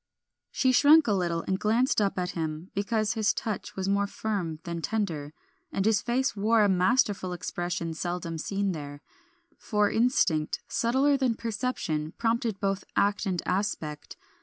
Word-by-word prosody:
She 260 - +2
shrunk 290 +4 +6
a 215 - +2
little 170 -3 0
and 190 0 -1
glanced 225 +2 +2
up 200 -2 0
at 180 -1 -1
him, 160 +1 -4
because 215 +1 0
his 220 -1 +1
touch 215 -4 -4
was 190 0 -2
more 200 0 +2
firm 195 -7 -3
than 170 -1 -4
tender, 165 -9 -2 0.4
and 195 - -1
his 220 -2 +3
face 250 +2 0
wore 215 +2 +3
a - - +4
masterful 190 -1 +2
expression 175 -1 -3
seldom 170 0 -4
seen 200 +3 -1
there; 145 -3 -7 0.6
for 210 -2 +1
instinct, 200 -10 +2
subtler 265 +4 +2
than 255 -4 +1
perception, 210 -10 -3
prompted 230 -3 0
both 195 -1 -1
act 205 +1 +1
and 180 -3 -1
aspect. 180 -6 -3
200 Hz, 155 wpm, -28 LUFS, 175-225 Hz, 0.6 s, shrunk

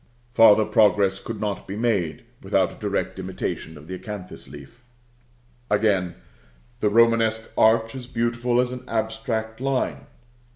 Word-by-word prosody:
Farther 110 -2 +6
progress 105 -3 +3
could 115 0 -6
not 105 -2 -3
be 95 - -5
made 100 -9 -1 0.2
without - - +1
a - - -12
direct - - -2
imitation 80 -1 -5
of 75 - -13
the 95 - -7
acanthus 95 0 -8
leaf. 75 - -13 0.9
Again: 100 -5 +1 0.6
the 105 - +2
Romanesque 115 0 +3
arch 115 0 +3
is 130 -2 -8
beautiful 120 0 0
as 125 0 +1
an 125 0 -7
abstract 110 0 -3
line. 135 -1 -1
110 Hz, 135 wpm, -24 LUFS, 100-115 Hz, 0.9 s, Farther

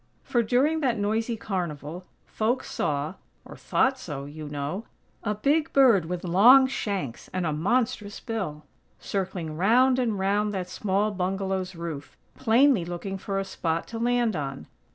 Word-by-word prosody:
For, 240 - +1
during 265 +8 +2
that 255 -6 +1
noisy 225 +3 -1
carnival, 175 -4 -4 0.2
folks 235 +4 -1
saw 150 +2 -1 0.3
(or - - -10
thought 265 0 +1
so, 145 - -6
you 150 +1 -8
know), 145 +9 -4 0.4
a 210 -1 -1
big 295 +9 +1
bird 240 - +5
with 175 +1 -4
long 225 +10 +7
shanks 200 - -3
and 185 -1 -2
a 155 - 0
monstrous 210 +4 0
bill, 190 -11 -4 0.3
circling 180 -5 -3
round 250 +8 +4
and 230 -5 0
round 205 +2 0
that 185 -2 -3
small 200 +2 0
bungalow's 190 -1 -2
roof, 165 -4 -7 0.2
plainly 240 -2 +4
looking 175 +3 -5
for 195 +1 -3
a 195 - -1
spot 165 -3 -2
to 230 - -5
land 240 -2 +1
on. 135 -3 -4
195 Hz, 155 wpm, -26 LUFS, 170-230 Hz, 0.4 s, long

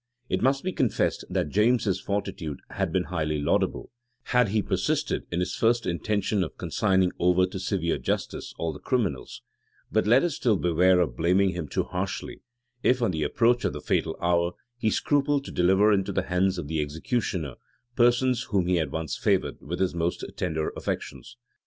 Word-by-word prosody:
It - - 0
must 135 +2 +2
be 185 - -1
confessed, 130 - 0
that 75 - -1
James's 105 - +2
fortitude 95 -7 -3
had 95 -4 -2
been 90 +1 +1
highly 75 -4 -2
laudable, 70 - 0 0.3
had 125 -4 +2
he 105 0 +1
persisted - - -1
in 85 +1 0
his 90 +1 -2
first 115 0 +2
intention 100 +2 0
of 80 - -7
consigning 95 -1 +1
over 90 +1 +4
to 95 +1 -6
severe 95 -3 -1
justice - - -3
all 80 -1 -2
the - - -10
criminals: 105 - -2 0.5
but 95 - +1
let 120 +5 +5
us 175 -3 0
still 115 -6 +1
beware 90 +1 +3
of 70 -9 -1
blaming 90 +6 +3
him 90 -4 -4
too - - -1
harshly, 95 +2 -4 0.4
if, 125 +1 +3
on 115 - +2
the 80 -3 -3
approach 120 +10 +2
of 100 - 0
the 75 - -5
fatal 80 +2 -1
hour, 85 0 +1 0.2
he 115 -3 0
scrupled 145 +2 +1
to - - -7
deliver 95 +4 +4
into 95 0 0
the 95 -1 0
hands 90 +1 +1
of 85 -5 -4
the 80 0 -1
executioner 80 - -2 0.4
persons 120 0 +3
whom 95 -4 +1
he 90 0 +2
had 80 -5 -1
once 80 -4 -3
favored - - 0
with 85 +5 -5
his 95 -1 +1
most 85 0 -2
tender 80 -3 -1
affections. 120 - -5
95 Hz, 185 wpm, -26 LUFS, 85-110 Hz, 0.5 s, let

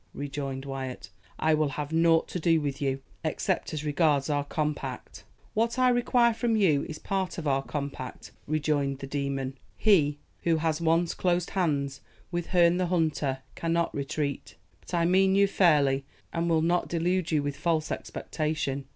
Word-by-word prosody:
rejoined 140 -1 -4
Wyat. 135 -2 -6 0.3
"I 160 0 +2
will 155 -1 +2
have 150 0 -3
nought 165 0 +4
to 180 - -3
do 165 -1 +3
with 145 -2 -3
you, 135 -1 -1 0.2
except - - -1
as 155 -1 -4
regards 150 -1 +2
our 145 -1 +1
compact." 145 -3 -4 0.3
"What 230 +2 +1
I 255 0 +5
require 240 -1 +3
from 230 0 0
you 165 -10 +3
is 155 - -5
part 190 -1 -2
of 160 -3 -3
our 135 -1 +2
compact," 140 -2 -6 0.2
rejoined 145 -2 0
the 135 - -7
demon. 135 -1 -3 0.2
"He 155 -9 +4 0.2
who 165 -1 +2
has 160 0 0
once 165 +1 +2
closed 175 -1 0
hands 140 -7 -1 0.3
with 175 -1 -2
Herne 175 -1 +4
the 180 -1 +1
Hunter 150 -6 0
cannot 170 0 0
retreat. 140 0 -3 0.2
But - - -6
I 170 -1 +2
mean 190 +2 +4
you 200 0 +6
fairly, 145 -8 +3 0.3
and 170 0 0
will 160 -1 +3
not 175 +1 +1
delude 175 +1 0
you 150 -2 +2
with 145 0 -2
false 155 +1 0
expectation. 150 -3 -3
155 Hz, 170 wpm, -28 LUFS, 140-175 Hz, 0.3 s, you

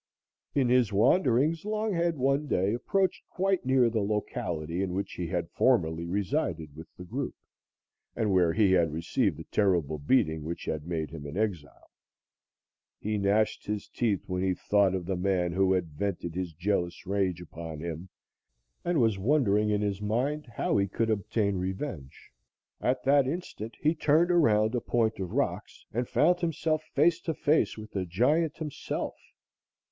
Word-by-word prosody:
In 135 -3 +3
his 125 -4 +3
wanderings, 130 - +3
Longhead 205 -6 0
one 140 +2 +1
day 95 -3 +1
approached 190 +10 0
quite 190 -6 0
near 130 -2 +4
the 115 -2 0
locality 90 -5 -2
in 90 -2 -2
which 100 - -3
he 90 - -4
had - - -3
formerly 80 +1 +2
resided 90 - -2
with 80 +1 -10
the 90 - -8
group, 90 - -4 0.8
and 110 -3 0
where 90 -3 +4
he 100 0 +3
had 85 -4 +3
received 80 -1 0
the 80 - -7
terrible 85 -7 +1
beating 80 - +2
which 85 +2 -5
had 75 0 -3
made 80 -3 -3
him 75 -3 -7
an 75 +5 -6
exile. 90 -10 -3 1.1
He 105 0 -2
gnashed 100 +2 +1
his 105 -1 -3
teeth 110 -6 0
when 90 -1 -2
he 95 -1 +1
thought 100 0 +2
of 90 -2 -3
the 95 +1 -1
man 90 -1 0
who 95 +2 +2
had 90 -3 0
vented 85 +1 -3
his 90 -1 -3
jealous 90 +1 -2
rage 95 -2 0
upon 80 -2 -8
him 85 +2 -6 0.7
and 175 -3 +1
was 110 -5 +2
wondering 105 -3 +2
in 105 -1 +1
his 100 -1 -2
mind 130 +8 -1
how 105 -2 -1
he 100 0 +2
could 115 +3 -1
obtain 100 -1 0
revenge. 95 - -5 0.5
At 125 +1 0
that 140 0 +4
instant 135 - -5
he 155 +2 +2
turned 160 +2 +3
around 110 -10 +3
a 120 - 0
point 110 -3 0
of 95 -2 -3
rocks - - -2
and 120 +2 -2
found 175 +4 +3
himself 160 -2 0
face 165 +4 +4
to 160 - -3
face 155 -4 +2
with 110 -1 -9
the 95 -2 -3
giant 145 - +1
himself. 150 -3 -4
105 Hz, 165 wpm, -28 LUFS, 90-130 Hz, 1.1 s, near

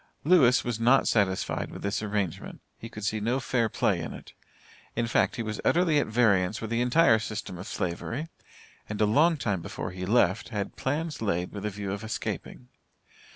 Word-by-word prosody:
Lewis 140 -7 +5
was 120 -3 -3
not 125 +4 +4
satisfied 100 -4 0
with - - -9
this 100 +1 -1
arrangement; 100 -5 -3 0.2
he 115 - -8
could 105 -2 -9
see 110 +2 0
no 120 +5 0
fair 120 -3 0
play - - +1
in - - -5
it. - - -12 0.6
In 120 - 0
fact, 115 - +1
he 115 - -3
was 110 -1 -4
utterly 170 -3 +3
at - - 0
variance 105 -4 +2
with 110 0 -6
the 115 +1 +1
entire 125 -2 +4
system 105 -4 -5
of 95 - -7
Slavery, 115 - -3 0.6
and, 105 - -4
a 105 - +4
long 155 +10 +4
time 100 -9 -1
before 90 - -5
he 90 0 -5
left, 100 -3 +2
had 105 -4 -4
plans 150 +1 -2
laid 90 -5 -1
with 105 0 -4
a - - -1
view 100 -1 -5
of 100 +2 -5
escaping. 125 +2 -5
110 Hz, 195 wpm, -27 LUFS, 100-125 Hz, 0.6 s, Lewis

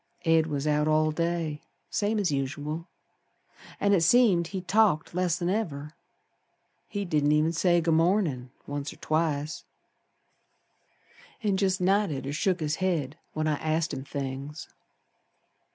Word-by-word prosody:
Ed 165 -1 +4
was 145 -2 -2
out 150 0 +2
all 155 0 +3
day 165 -2 -2 0.3
Same 210 +1 0
as 195 -6 +1
usual. 145 +4 -3 0.9
An' 200 0 +3
it 185 - +4
seemed 180 -2 +4
he 190 +1 -4
talked 185 -5 +2
less'n 175 -1 0
ever. 155 -7 -2 0.9
He 200 -1 -3
didn't 150 -3 +2
even 155 +2 +3
say 175 +1 +3
'Good 165 0 +1
mornin'', 165 -7 +1 0.2
once 145 0 -4
or - - -12
twice, 155 -1 -1 1.8
An' 205 -2 +2
jest 190 -1 +1
nodded 180 -8 +1
or 140 - -3
shook 180 +3 0
his 150 0 -1
head 165 -6 -1
when 155 0 -1
I 155 -1 +1
asked 155 +1 -1
him 130 - -4
things. 140 +2 -5
160 Hz, 135 wpm, -27 LUFS, 150-185 Hz, 1.8 s, Ed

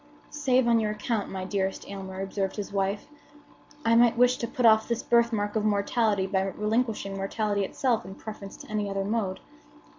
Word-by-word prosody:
"Save 260 -4 +2
on 230 -1 +4
your 215 -1 0
account, 210 0 -2
my 190 -1 -4
dearest 195 0 -2
Aylmer," 190 -1 -6
observed 195 0 -2
his 205 -1 -5
wife, 195 +1 -1 0.8
"I 230 - +4
might 235 0 +5
wish 250 +1 +4
to 235 - -3
put 245 +1 -1
off 220 -1 +6
this 235 -1 -2
birthmark 230 -3 +2
of 215 - +1
mortality 205 -1 +1
by 190 0 0
relinquishing 210 +1 -1
mortality 200 +1 -1
itself 235 +4 0
in 190 +1 -9
preference 205 -2 -9
to 285 - -12
any 210 -1 -1
other 195 0 -2
mode. 205 -3 -1
210 Hz, 180 wpm, -27 LUFS, 195-230 Hz, 0.8 s, off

